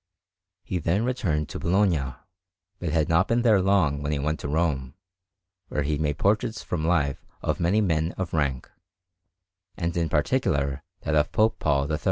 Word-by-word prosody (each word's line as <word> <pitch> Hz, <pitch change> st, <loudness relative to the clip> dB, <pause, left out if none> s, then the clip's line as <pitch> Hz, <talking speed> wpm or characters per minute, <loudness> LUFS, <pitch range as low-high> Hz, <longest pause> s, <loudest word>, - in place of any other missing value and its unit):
He 90 Hz, -1 st, -2 dB
then 95 Hz, +7 st, +1 dB
returned 90 Hz, -, -1 dB
to -, -, -6 dB
Bologna, 85 Hz, -8 st, +1 dB, 0.6 s
but 85 Hz, -, -3 dB
had 80 Hz, -1 st, +1 dB
not 85 Hz, -1 st, +3 dB
been 120 Hz, +1 st, +1 dB
there 110 Hz, -5 st, +5 dB
long 90 Hz, -7 st, +2 dB
when 75 Hz, +1 st, -2 dB
he 75 Hz, -, 0 dB
went 75 Hz, +3 st, -1 dB
to -, -, -4 dB
Rome, 70 Hz, -4 st, -1 dB, 0.7 s
where 75 Hz, -, -1 dB
he 75 Hz, 0 st, -1 dB
made 75 Hz, -2 st, 0 dB
portraits 110 Hz, +3 st, 0 dB
from 85 Hz, -3 st, -3 dB
life 75 Hz, -6 st, +1 dB, 0.2 s
of -, -, -1 dB
many 95 Hz, +6 st, +2 dB
men 80 Hz, -3 st, 0 dB
of 95 Hz, -2 st, -4 dB
rank, 70 Hz, -5 st, 0 dB, 1.1 s
and 85 Hz, -1 st, -2 dB
in 85 Hz, -2 st, 0 dB
particular 70 Hz, -1 st, 0 dB, 0.2 s
that 75 Hz, -, -2 dB
of 75 Hz, 0 st, +2 dB
Pope 110 Hz, +1 st, +2 dB
Paul 70 Hz, -1 st, +1 dB
III. 75 Hz, -, 0 dB
80 Hz, 175 wpm, -26 LUFS, 75-95 Hz, 1.1 s, there